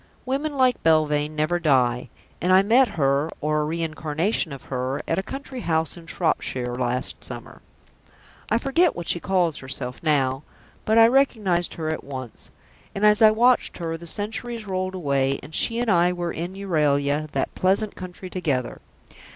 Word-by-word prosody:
Women 280 +3 -2
like 255 -1 +3
Belvane 155 -1 +2
never 155 +3 0
die, 125 -6 +2 0.3
and 180 - +1
I 190 +1 +6
met 245 +5 +5
her 140 +1 +2
(or 150 0 0
a - - -1
reincarnation 160 +3 -1
of 140 - -8
her) 130 +2 -3
at 165 - +1
a - - 0
country 270 +4 -7
house 160 -6 0
in 170 -1 -13
Shropshire 130 -8 -1
last 125 0 -2
summer. - - -9 0.9
I 225 - +3
forget 280 +7 +2
what 175 -1 -6
she 175 - +1
calls 175 -4 +1
herself 130 -2 -6
now, 135 -4 +1 0.4
but 220 +1 +3
I 225 - +9
recognised 220 -9 +2
her 160 -1 -3
at 160 - -3
once; 130 -4 -8 0.5
and, 200 +2 +1
as 210 +1 +5
I 220 - +9
watched 240 +3 +3
her, 165 -2 -3
the 170 +1 -9
centuries 225 +4 -3
rolled 185 -1 -2
away 140 -5 0
and 150 - -11
she 230 +7 0
and 240 -2 +1
I 175 0 +4
were 175 -1 -3
in 175 +3 -5
Euralia, 150 -5 +1
that - - -1
pleasant 195 +3 +1
country, 185 0 -9
together. 145 -9 -2
170 Hz, 170 wpm, -24 LUFS, 145-205 Hz, 0.9 s, I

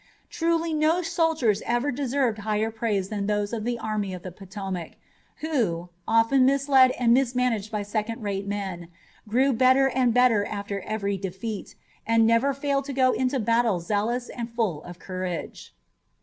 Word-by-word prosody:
Truly 330 0 0
no 315 +3 +2
soldiers 320 - +1
ever 240 +4 0
deserved 260 -3 0
higher 215 +1 -1
praise 215 -4 -1
than 205 -2 -3
those 205 +1 -1
of 220 -2 -3
the 240 +1 -1
Army 215 -4 -3
of 180 - -10
the 185 - -6
Potomac, 190 -2 -6 0.5
who, 215 - -1 0.2
often 230 +4 +4
misled 270 -1 +5
and 235 -2 +4
mismanaged 250 -4 +1
by 210 -2 -2
second 215 +2 -3
rate 200 -1 -3
men, 190 -4 -4 0.4
grew 260 +5 +2
better 260 +3 +4
and 255 -2 +2
better 240 -3 +4
after 200 -1 -4
every 200 -1 -2
defeat, 195 +3 -5 0.3
and 230 0 +4
never 230 +5 +3
failed 275 0 -1
to 280 - -5
go 260 -1 +3
into 260 +1 0
battle 230 -3 +2
zealous 215 +7 -1
and 235 -1 -5
full 220 -10 -1
of 175 0 -9
courage. 185 -2 -6
225 Hz, 160 wpm, -25 LUFS, 200-260 Hz, 0.5 s, misled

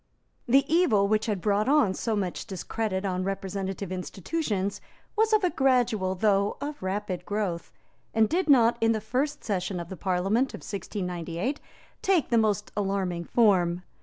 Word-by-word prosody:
The 270 +3 +5
evil 270 - +3
which 215 +2 +1
had 205 -4 -1
brought 210 +4 +1
on 285 -10 +4
so 225 +3 -1
much 190 -1 -3
discredit 195 0 -3
on 185 -1 -1
representative 195 0 -4
institutions 195 - -3 0.3
was 440 0 +2
of 410 -5 +2
gradual 240 -8 +2
though 200 +1 +2
of 290 +1 -5
rapid 190 -1 -3
growth, 200 -5 -3 0.4
and 220 -1 +3
did 345 - 0
not, 235 -4 +5
in 225 0 +4
the 220 - -1
first 255 +7 -2
session 185 -3 -2
of 170 0 -7
the 190 - -6
Parliament 195 +8 0
of - - -11
1698, 180 - -4 0.4
take 375 -6 +2
the 235 - +4
most 210 -2 0
alarming 190 -4 -1
form. 180 -6 +3
205 Hz, 155 wpm, -27 LUFS, 190-235 Hz, 0.4 s, The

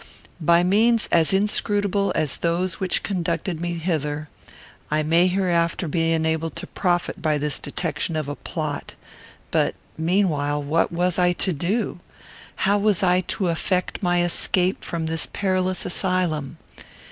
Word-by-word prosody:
By 170 +2 +4
means 220 +5 +3
as 165 -2 +4
inscrutable 205 0 +1
as 150 - +1
those 170 +1 -1
which 185 -2 0
conducted 170 -2 -2
me 175 0 -2
hither, 155 -3 -2 0.6
I 155 +1 +1
may 165 +4 +4
hereafter 175 -2 +1
be 165 +1 +1
enabled 160 0 0
to - - -5
profit 175 -2 -1
by 155 -2 +1
this 150 0 -2
detection 165 +2 -2
of 155 -2 -2
a 145 - -4
plot. 155 -3 -5 0.6
But, - - +1 0.2
meanwhile, 160 -5 +1
what 155 +4 +1
was 175 +1 0
I 180 0 +4
to 185 +1 -1
do? 180 +6 -1 0.7
How 200 +1 +3
was 205 -2 +2
I 180 0 +4
to 190 -4 -1
effect 180 +2 -1
my 175 -2 +2
escape 180 +1 +1
from 165 -2 -3
this 160 0 0
perilous 185 -2 0
asylum? 175 -6 0
175 Hz, 145 wpm, -23 LUFS, 160-185 Hz, 0.7 s, By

